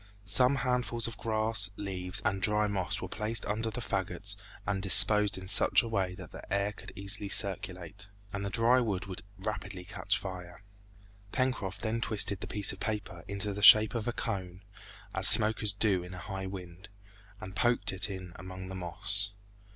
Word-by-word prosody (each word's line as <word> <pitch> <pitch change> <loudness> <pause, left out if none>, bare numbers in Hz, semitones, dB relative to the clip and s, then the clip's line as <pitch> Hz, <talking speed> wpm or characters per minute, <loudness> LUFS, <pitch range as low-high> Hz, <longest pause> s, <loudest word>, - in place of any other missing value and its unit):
Some 125 +8 +2
handfuls 125 -3 0
of 115 - -8
grass, 110 -2 0
leaves, 90 -3 -2
and 95 -1 -1
dry 105 +1 +1
moss 100 -3 -3
were - - -5
placed 110 +1 -1
under 110 +2 -3
the 110 - -7
fagots - - -2 0.3
and 95 0 -3
disposed 105 +1 +6
in 95 0 -10
such 110 +5 +4
a - - -6
way 95 -5 -3
that - - -12
the - - -13
air 100 +1 -1
could 105 - -12
easily 100 +1 -2
circulate, 100 -1 -2 0.3
and 100 0 -5
the 100 - -4
dry 115 +4 +2
wood 100 -6 -3
would 95 -1 -8 0.2
rapidly 95 -2 -6
catch - - -3
fire. 90 0 -10 0.7
Pencroft 130 -8 -3
then 115 +1 -3
twisted 100 -3 0
the - - -6
piece 105 -2 0
of 95 - -13
paper 105 -5 -6
into 100 +1 -2
the 105 - -7
shape 110 +1 +7
of 115 -2 -4
a - - 0
cone, 95 -4 -6 0.5
as - - +6
smokers 110 0 +8
do 100 -2 0
in 90 +1 -10
a - - -9
high 95 +1 -7
wind, 95 0 -11 0.5
and 95 -2 -10
poked 120 -5 0
it 95 +2 -1
in 95 -3 -8
among 95 0 -10
the - - -8
moss. 100 +3 +2
100 Hz, 180 wpm, -29 LUFS, 95-110 Hz, 0.7 s, smokers